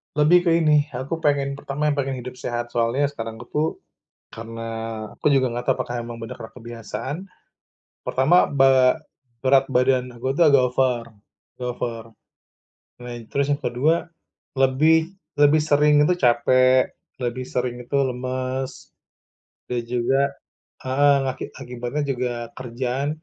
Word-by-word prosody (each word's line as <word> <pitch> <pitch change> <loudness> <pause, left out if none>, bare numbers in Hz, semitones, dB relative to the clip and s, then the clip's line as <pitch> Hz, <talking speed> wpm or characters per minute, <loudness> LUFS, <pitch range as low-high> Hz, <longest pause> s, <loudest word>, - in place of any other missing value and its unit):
Lebih 175 +4 +4
ke 170 - +5
ini, 150 -1 +4
aku 130 +6 -4
pengen, 140 -2 0
pertama 145 +1 -2
yang 145 - -3
pengen 135 -1 -1
hidup 125 +1 -8
sehat, 120 0 -4
soalnya 120 +5 +1
sekarang 115 -5 -6
aku 120 - -10
tuh, 155 +2 +1 0.6
karena 115 0 -7 0.5
aku - - -6
juga 130 -2 +2
enggak 120 +1 -4
tau - - -4
apakah 120 0 -4
emang 120 0 -6
bener 115 - -6
karena 110 0 -10
kebiasaan. 120 +4 -6 0.9
Pertama 150 +8 +4
be 135 -2 +5 0.5
berat 135 0 +4
badan 125 0 +2
aku 120 +2 -5
tuh 170 - +5
agak 140 -3 +5
over 125 -2 +1 0.5
agak 125 -1 -4
over. 115 -2 -4 1.0
Nah, 120 - -7 0.2
terus 140 0 +1
yang 145 - 0
kedua 135 +7 +2 0.6
lebih 135 +5 +4 0.4
lebih 150 +2 +6
sering 150 0 +4
itu 180 - +4
capek, 130 +2 +4 0.3
lebih 120 +1 -2
sering 125 -1 -2
itu 140 +4 -2
lemes. 130 +1 -4 0.8
Dan 120 -1 -1
juga 125 +3 +1 0.6
heeh, 140 +2 +4
aki - - -7
akibatnya 125 +2 -4
juga 125 -1 -2 0.2
kerjaan, 130 +2 -3
130 Hz, 140 wpm, -23 LUFS, 120-140 Hz, 1.0 s, lebih